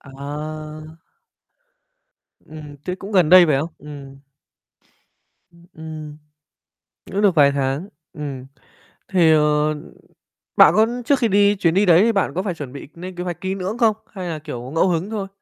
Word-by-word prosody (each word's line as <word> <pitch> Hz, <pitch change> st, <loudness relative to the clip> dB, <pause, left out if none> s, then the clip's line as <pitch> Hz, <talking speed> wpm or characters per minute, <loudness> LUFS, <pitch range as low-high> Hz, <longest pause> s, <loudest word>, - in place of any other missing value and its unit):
À. 155 Hz, +3 st, -8 dB, 1.5 s
Ừm, 150 Hz, -2 st, -11 dB
thế 180 Hz, -, -3 dB
cũng 195 Hz, +3 st, -9 dB
gần 180 Hz, -6 st, +4 dB
đây, 180 Hz, 0 st, +8 dB
phải 150 Hz, -, +2 dB
không? 160 Hz, +4 st, -3 dB
Ừm. 140 Hz, -2 st, -11 dB, 1.3 s
Ưm, 170 Hz, 0 st, -20 dB
ừm. 155 Hz, -2 st, -9 dB, 1.0 s
Cũng 200 Hz, -, -1 dB
được 195 Hz, -4 st, +3 dB
vài 140 Hz, -2 st, +5 dB
tháng, 140 Hz, +6 st, -2 dB, 0.2 s
ừm, 140 Hz, -5 st, -6 dB, 0.6 s
thì, 175 Hz, -4 st, +4 dB
ờ, 150 Hz, 0 st, +2 dB
ừm, 155 Hz, +1 st, -6 dB, 0.7 s
bạn -, -, +8 dB
có 220 Hz, +1 st, +4 dB, 0.2 s
trước 280 Hz, 0 st, +2 dB
khi 235 Hz, -, +2 dB
đi 205 Hz, 0 st, +3 dB
chuyến 170 Hz, -4 st, +1 dB
đi 200 Hz, +3 st, +3 dB
đấy 175 Hz, 0 st, +6 dB
thì 230 Hz, -, +3 dB
bạn 195 Hz, -9 st, 0 dB
có 185 Hz, -, -1 dB
phải 195 Hz, -3 st, -2 dB
chuẩn 145 Hz, -6 st, -8 dB
bị 140 Hz, -, -9 dB
nên 180 Hz, +2 st, -8 dB
kế 175 Hz, -, -4 dB
hoạch 175 Hz, -2 st, -5 dB
kỹ 190 Hz, 0 st, -2 dB
lưỡng 195 Hz, +4 st, -4 dB
không? 225 Hz, -3 st, +3 dB, 0.2 s
Hay 185 Hz, -3 st, -6 dB
là, 160 Hz, -2 st, -4 dB
kiểu, 130 Hz, -5 st, -7 dB
ngẫu 165 Hz, -, +3 dB
hứng 175 Hz, +3 st, -1 dB
thôi? 205 Hz, -3 st, -4 dB
160 Hz, 175 wpm, -21 LUFS, 150-190 Hz, 1.5 s, đây